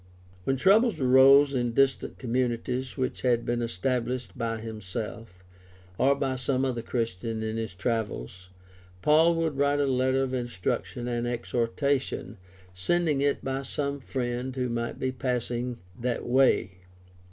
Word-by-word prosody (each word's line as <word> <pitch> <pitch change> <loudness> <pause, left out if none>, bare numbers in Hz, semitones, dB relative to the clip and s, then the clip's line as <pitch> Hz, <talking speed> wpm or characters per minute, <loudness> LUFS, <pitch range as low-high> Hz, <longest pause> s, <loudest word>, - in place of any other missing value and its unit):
When 135 - +1
troubles 205 - +4
arose 135 +2 +6
in 120 -2 0
distant 135 +1 +1
communities 125 +1 -2
which 130 -1 -2
had 120 -2 +2
been 120 0 -1
established 120 +3 -2
by 115 -2 -2
himself, 110 -2 -7 0.6
or 140 +2 +4
by 135 -1 -1
some 130 +1 0
other 125 -3 -1
Christian 115 -1 -3
in 110 0 -2
his 110 -5 -4
travels, 95 - -3 0.5
Paul 160 +3 +5
would 160 -4 -1
write 145 +1 +2
a 145 - +3
letter 130 0 +2
of 130 -1 -3
instruction 120 0 -3
and 120 0 -1
exhortation, 120 +3 -1 0.4
sending 150 - +1
it 140 0 +1
by 135 0 -2
some 140 +1 -3
friend 125 0 -3
who 125 -1 -1
might 120 0 -3
be 130 - -1
passing 125 -1 -2 0.2
that 120 0 -2
way. 120 -7 +2
125 Hz, 140 wpm, -27 LUFS, 115-135 Hz, 0.6 s, arose